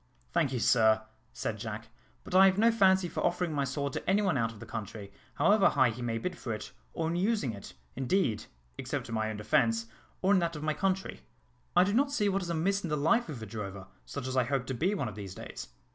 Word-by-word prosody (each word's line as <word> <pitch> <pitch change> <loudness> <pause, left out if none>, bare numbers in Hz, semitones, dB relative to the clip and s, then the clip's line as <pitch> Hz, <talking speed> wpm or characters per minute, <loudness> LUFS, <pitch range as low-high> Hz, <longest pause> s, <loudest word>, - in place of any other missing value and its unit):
"Thank 165 -6 +1
you, 130 - -1
sir," 110 -2 +4 0.3
said 110 -1 -4
Jack, 110 +1 -6 0.3
"but - - -9
I 190 +1 +8
have 190 0 +2
no 230 +2 +5
fancy 190 -4 +4
for - - -4
offering 175 -1 0
my 140 -1 0
sword 140 +1 -3
to - - -3
any 200 +2 +3
one 185 -6 +2
out 115 -3 +1
of 115 - -13
the 120 - -9
country, 110 -2 -7 0.2
however 195 +6 +5
high 130 -4 +3
he 120 +3 -8
may 115 -1 -1
bid 180 +9 -3
for 125 - -6
it, 105 - -6 0.2
or 160 - -2
in 170 - -1
using 190 - +1
it, 100 -10 -10 0.2
indeed, 130 - 0 0.3
except - - -4
in - - -5
my 110 -1 0
own 110 - -4
defence, 115 +2 +2 0.4
or 195 +2 +4
in 195 - +5
that 170 -1 -1
of 150 - -6
my 155 0 +1
country. 190 +2 -1 0.5
I 180 - +7
do 200 +2 0
not 275 +4 +2
see 210 -8 +1
what 195 0 0
is 175 - -5
amiss 185 +5 +1
in 170 - -3
the 150 - 0
life 195 +11 +2
of 125 -7 -6
a - - -4
drover, 100 -3 -6 0.2
such 140 -3 -6
as 130 0 -3
I 130 -2 +3
hope 135 0 -1
to 130 - -3
be 180 - 0
one 140 -10 -2
of 105 - -5
these 100 -2 -8
days. - - -8
140 Hz, 250 wpm, -30 LUFS, 115-185 Hz, 0.5 s, I